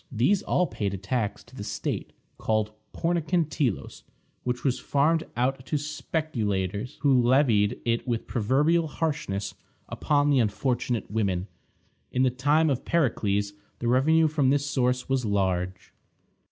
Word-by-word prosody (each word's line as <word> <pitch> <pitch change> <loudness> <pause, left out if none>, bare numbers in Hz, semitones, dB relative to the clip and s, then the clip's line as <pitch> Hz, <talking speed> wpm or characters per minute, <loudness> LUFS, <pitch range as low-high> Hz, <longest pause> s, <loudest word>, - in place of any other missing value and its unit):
These 135 - +2
all 180 - +1
paid 100 - -3
a - - -5
tax 105 +1 -2
to 120 - -18
the 105 - -6
state, - - -3 0.3
called 110 -1 0 0.2
Pornikon 170 -1 0
Telos, 135 - -2 0.4
which 125 0 -2
was 130 -2 +1
farmed 155 +3 +2
out 130 +2 0
to 150 - 0
speculators, 115 - -2
who 135 -3 +4
levied 120 -4 +3
it 115 +2 0
with 115 -2 -1
proverbial 145 +9 +2
harshness 105 -12 -2 0.3
upon 145 -1 +1
the 135 - +4
unfortunate 120 0 -1
women. 95 -4 0 0.7
In 130 - +2
the 130 - +3
time 145 +5 +2
of 130 - -2
Pericles 105 -10 0 0.2
the 120 - -3
revenue 155 +6 +4
from 145 -3 +2
this 140 +1 +2
source 125 -3 0
was 135 -1 0
large. 95 -3 -1
125 Hz, 140 wpm, -26 LUFS, 105-145 Hz, 0.7 s, who